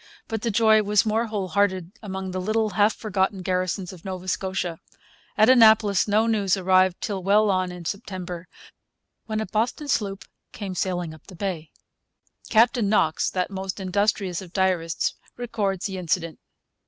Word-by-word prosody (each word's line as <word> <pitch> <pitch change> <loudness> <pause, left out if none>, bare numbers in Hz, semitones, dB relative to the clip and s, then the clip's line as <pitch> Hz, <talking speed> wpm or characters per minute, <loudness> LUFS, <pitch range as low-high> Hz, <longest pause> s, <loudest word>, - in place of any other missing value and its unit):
But 225 -1 -3
the 235 - -1
joy 220 0 +4
was 210 +1 +2
more 225 +2 +1
whole 205 -4 -3
hearted 185 -1 0
among 190 -2 -5
the 185 0 -3
little, 215 +2 0
half 210 +1 +3
forgotten 195 -3 -1
garrisons 185 0 -2
of 175 - -13
Nova 185 -1 -6
Scotia. 185 -2 -2 0.6
At 215 +1 +6
Annapolis 220 -6 +5
no 210 +2 +3
news 205 -4 +1
arrived 185 -1 +3
till 195 -2 -3
well 205 +2 +3
on 185 -1 0
in 180 -1 -9
September, 180 -2 -5 0.8
when 215 -1 -2
a 220 - -2
Boston 225 +9 -2
sloop 200 -7 -1 0.3
came 200 -3 -5
sailing 175 -3 -2
up 155 - -16
the 190 - -12
bay. 170 -4 -4 0.8
Captain 225 -1 +3
Knox, 160 -7 +2
that 185 +1 -2
most 190 0 -5
industrious 190 -1 0
of 180 -2 -12
diarists, 185 -4 0 0.2
records 205 -6 -2
the 190 -2 -3
incident. 170 -2 -2
195 Hz, 160 wpm, -24 LUFS, 185-215 Hz, 0.8 s, At